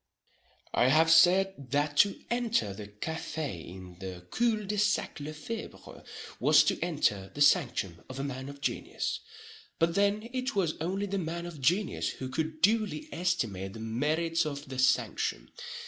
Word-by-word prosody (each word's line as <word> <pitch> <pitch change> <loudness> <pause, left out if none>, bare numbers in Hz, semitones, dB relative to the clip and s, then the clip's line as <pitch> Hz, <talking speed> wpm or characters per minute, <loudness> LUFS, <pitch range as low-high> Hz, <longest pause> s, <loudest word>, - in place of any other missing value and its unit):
I 125 - +4
have 160 +4 +5
said 175 -3 +5
that 145 +2 0
"to 200 +4 +4
enter 235 - +1
the 105 +1 -8
café 145 - -4
in 90 0 -11
the 90 -2 -7
cul 225 -3 +1
de 210 +1 -1
sac 210 -5 +1
Le 145 +1 -5
Febre 215 +9 -8 0.4
was - - +6
to - - 0
enter 125 - 0
the 145 - -4
sanctum 120 - +3
of 130 +1 -7
a - - -2
man 135 -1 -5
of 140 0 -11
genius"—but 445 - -3
then 205 +3 +1
it 255 -2 -2
was 175 -6 +1
only 190 +5 -1
the 200 0 -2
man 170 0 -4
of 165 -5 -8
genius 180 +9 +1
who 130 - -6
could 155 +3 -3
duly 220 +8 +2
estimate 115 - -1
the 110 - -9
merits 155 +9 0
of 145 -2 -5
the 130 -1 -5
sanctum. 130 0 +1
160 Hz, 160 wpm, -30 LUFS, 130-195 Hz, 0.4 s, was